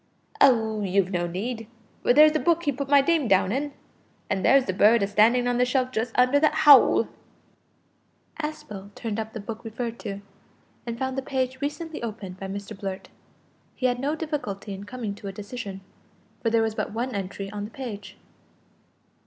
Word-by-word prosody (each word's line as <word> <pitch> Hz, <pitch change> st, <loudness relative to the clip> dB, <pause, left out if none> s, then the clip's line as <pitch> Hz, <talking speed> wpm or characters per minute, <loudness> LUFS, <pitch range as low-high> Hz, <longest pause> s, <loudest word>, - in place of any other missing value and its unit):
"Oh! 220 Hz, -5 st, +4 dB
you've 195 Hz, -1 st, +1 dB
no 175 Hz, -2 st, -1 dB
need, 220 Hz, +6 st, -4 dB, 0.3 s
for -, -, +3 dB
there's 305 Hz, +4 st, +7 dB
the 310 Hz, -, 0 dB
book 340 Hz, 0 st, +2 dB
he 290 Hz, -, +1 dB
put 275 Hz, +1 st, -5 dB
my 285 Hz, -1 st, +7 dB
name 310 Hz, -2 st, +1 dB
down 190 Hz, -1 st, +3 dB
in, 285 Hz, +4 st, -2 dB, 0.6 s
an' 190 Hz, -1 st, 0 dB
there's 270 Hz, +4 st, +5 dB
the 185 Hz, -, -1 dB
bird 210 Hz, +3 st, +5 dB
a -, -, +1 dB
standin' 230 Hz, +5 st, +3 dB
on 245 Hz, 0 st, +1 dB
the -, -, +5 dB
shelf 255 Hz, 0 st, 0 dB
just 225 Hz, 0 st, -2 dB
under 255 Hz, +3 st, +5 dB
the 310 Hz, +1 st, +5 dB
howl." 295 Hz, -3 st, +6 dB, 1.3 s
Aspel 210 Hz, -10 st, -6 dB
turned 225 Hz, -2 st, -4 dB
up 220 Hz, 0 st, -5 dB
the 220 Hz, -, -5 dB
book 220 Hz, +2 st, -7 dB
referred 230 Hz, +1 st, -5 dB
to, 200 Hz, -1 st, -6 dB, 0.7 s
and 235 Hz, 0 st, -3 dB
found 265 Hz, +1 st, -2 dB
the -, -, -3 dB
page 260 Hz, 0 st, -2 dB
recently 310 Hz, +3 st, -4 dB
opened 205 Hz, -5 st, -6 dB
by 195 Hz, -, -5 dB
Mr 200 Hz, +1 st, -6 dB
Blurt. 195 Hz, -1 st, -6 dB, 0.7 s
He 255 Hz, -, -3 dB
had 245 Hz, -1 st, +1 dB
no 285 Hz, +4 st, -1 dB
difficulty 275 Hz, -11 st, -4 dB
in 195 Hz, +1 st, -8 dB
coming 220 Hz, -1 st, -5 dB
to 200 Hz, 0 st, -9 dB
a -, -, -3 dB
decision, 200 Hz, -1 st, -7 dB, 0.6 s
for 230 Hz, -, +1 dB
there 225 Hz, 0 st, +3 dB
was 220 Hz, -1 st, -1 dB
but 215 Hz, -, -3 dB
one 240 Hz, +4 st, -3 dB
entry 195 Hz, 0 st, -5 dB
on 205 Hz, -1 st, -4 dB
the -, -, -8 dB
page. 210 Hz, -6 st, -8 dB
230 Hz, 190 wpm, -25 LUFS, 200-265 Hz, 1.3 s, there's